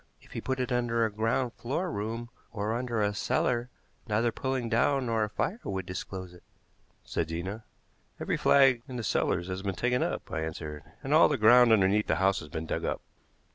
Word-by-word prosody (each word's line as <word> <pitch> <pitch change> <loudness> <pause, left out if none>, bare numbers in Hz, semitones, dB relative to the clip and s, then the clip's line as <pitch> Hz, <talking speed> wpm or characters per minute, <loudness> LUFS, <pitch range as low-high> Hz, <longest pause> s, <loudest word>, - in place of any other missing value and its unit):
"If - - -21
he - - -5
put 130 0 -2
it 125 -1 -2
under 120 -2 +1
a 110 - -2
ground 115 +4 0
floor 165 +9 -3
room 115 +2 -4 0.2
or 105 0 -2
under 120 -2 -1
a 105 0 +1
cellar 120 +3 0 0.4
neither 115 +2 +1
pulling 130 0 -2
down 130 +4 +2
nor 115 -2 +1
a 105 - -2
fire 190 - -2
would 95 -1 -3
disclose 95 0 -6
it," 90 - -15 0.6
said 80 - -2
Zena. 95 +7 -5 0.5
"Every - - -1
flag 135 -4 +5
in 130 - -7
the 120 - -3
cellars 90 -3 0
has 95 0 -4
been 95 -1 -3
taken 125 +3 +1
up," - - -3
I 80 - -2
answered; 80 -1 -5 0.2
"and - - -1
all - - +7
the - - +1
ground 120 +2 +7
underneath 105 0 +4
the - - +2
house 95 0 +2
has 75 - -10
been 80 +1 -4
dug - - -3
up." - - -2
110 Hz, 205 wpm, -29 LUFS, 95-125 Hz, 0.6 s, all